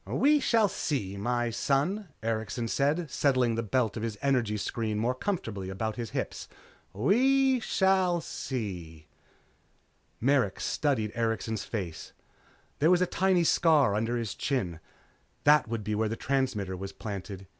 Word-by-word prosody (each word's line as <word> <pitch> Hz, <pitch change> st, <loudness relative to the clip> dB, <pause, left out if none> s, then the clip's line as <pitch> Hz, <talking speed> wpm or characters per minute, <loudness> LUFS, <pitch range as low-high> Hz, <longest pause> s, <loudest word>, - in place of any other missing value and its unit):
"We 295 Hz, +1 st, +3 dB
shall 225 Hz, -5 st, +3 dB
see, 125 Hz, -, -2 dB
my 120 Hz, +3 st, -1 dB
son," 165 Hz, -, 0 dB, 0.2 s
Erikson 115 Hz, +1 st, -2 dB
said 150 Hz, +4 st, 0 dB
settling 130 Hz, -4 st, +2 dB
the 115 Hz, -, -1 dB
belt 115 Hz, 0 st, 0 dB
of 110 Hz, -, -4 dB
his 110 Hz, -2 st, -3 dB
energy 125 Hz, -6 st, +1 dB
screen 110 Hz, +1 st, -2 dB
more 120 Hz, +4 st, +1 dB
comfortably 115 Hz, -, -3 dB
about 110 Hz, +3 st, -3 dB
his 115 Hz, -2 st, -4 dB
hips. -, -, -4 dB, 0.4 s
"We 260 Hz, -, +3 dB
shall 190 Hz, -5 st, +2 dB
see." 90 Hz, -, -5 dB, 1.1 s
Merrick 125 Hz, -6 st, +2 dB
studied 125 Hz, -8 st, 0 dB
Erikson's 115 Hz, -1 st, -2 dB
face. 90 Hz, -8 st, -5 dB, 0.7 s
There 155 Hz, -, +4 dB
was 180 Hz, 0 st, +5 dB
a -, -, +3 dB
tiny 185 Hz, 0 st, +2 dB
scar 155 Hz, -9 st, +4 dB
under 115 Hz, +3 st, 0 dB
his 115 Hz, -4 st, -3 dB
chin. 95 Hz, -, -2 dB, 0.6 s
That 150 Hz, -3 st, +5 dB
would 115 Hz, -1 st, -3 dB
be 105 Hz, +1 st, -2 dB
where 110 Hz, +1 st, 0 dB
the 115 Hz, -, -2 dB
transmitter 115 Hz, -9 st, -1 dB
was 95 Hz, +1 st, -6 dB
planted. 100 Hz, -2 st, -6 dB
120 Hz, 145 wpm, -29 LUFS, 105-150 Hz, 1.1 s, was